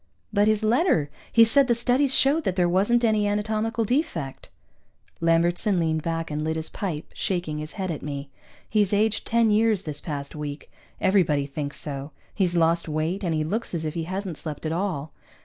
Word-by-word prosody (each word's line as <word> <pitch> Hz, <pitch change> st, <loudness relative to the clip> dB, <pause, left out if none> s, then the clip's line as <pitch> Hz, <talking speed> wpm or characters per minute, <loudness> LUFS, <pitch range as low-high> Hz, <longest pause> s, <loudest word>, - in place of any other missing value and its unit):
"But 205 Hz, 0 st, +3 dB
his 215 Hz, 0 st, +2 dB
letter! 215 Hz, -, +2 dB, 0.2 s
He 230 Hz, -1 st, +7 dB
said 270 Hz, +4 st, +4 dB
the 240 Hz, -, +3 dB
studies 250 Hz, +4 st, +2 dB
showed 290 Hz, +4 st, +4 dB
that 185 Hz, -, 0 dB
there 180 Hz, -2 st, +3 dB
wasn't 205 Hz, +7 st, +2 dB
any 215 Hz, -2 st, +3 dB
anatomical 220 Hz, +2 st, 0 dB
defect." 200 Hz, -, -2 dB, 0.7 s
Lambertson 170 Hz, +4 st, +2 dB
leaned 160 Hz, -1 st, 0 dB
back 165 Hz, 0 st, -3 dB
and 150 Hz, +1 st, -2 dB
lit 160 Hz, +1 st, -1 dB
his 160 Hz, 0 st, -4 dB
pipe, 170 Hz, -7 st, -4 dB
shaking 175 Hz, -5 st, -2 dB
his 155 Hz, +1 st, -6 dB
head 190 Hz, -4 st, -3 dB
at 155 Hz, -, -5 dB
me. 140 Hz, -1 st, -6 dB, 0.4 s
He's 210 Hz, -2 st, +1 dB
aged 215 Hz, +1 st, +1 dB
ten 230 Hz, -1 st, +3 dB
years 215 Hz, -2 st, +3 dB
this 150 Hz, -2 st, -4 dB
past 145 Hz, -3 st, -5 dB
week. 150 Hz, -1 st, -6 dB, 0.3 s
Everybody 170 Hz, -7 st, +2 dB
thinks 145 Hz, +1 st, -5 dB
so. 140 Hz, 0 st, -6 dB, 0.2 s
He's 180 Hz, -3 st, +1 dB
lost 165 Hz, 0 st, +2 dB
weight, 160 Hz, +6 st, -1 dB
and 170 Hz, -3 st, 0 dB
he 155 Hz, -, 0 dB
looks 205 Hz, +4 st, -2 dB
as 160 Hz, -1 st, -2 dB
if 155 Hz, -, -2 dB
he 165 Hz, -1 st, -3 dB
hasn't 185 Hz, -2 st, -4 dB
slept 155 Hz, -1 st, -6 dB
at 155 Hz, -, -1 dB
all. 165 Hz, -5 st, -2 dB
175 Hz, 190 wpm, -25 LUFS, 155-215 Hz, 0.7 s, He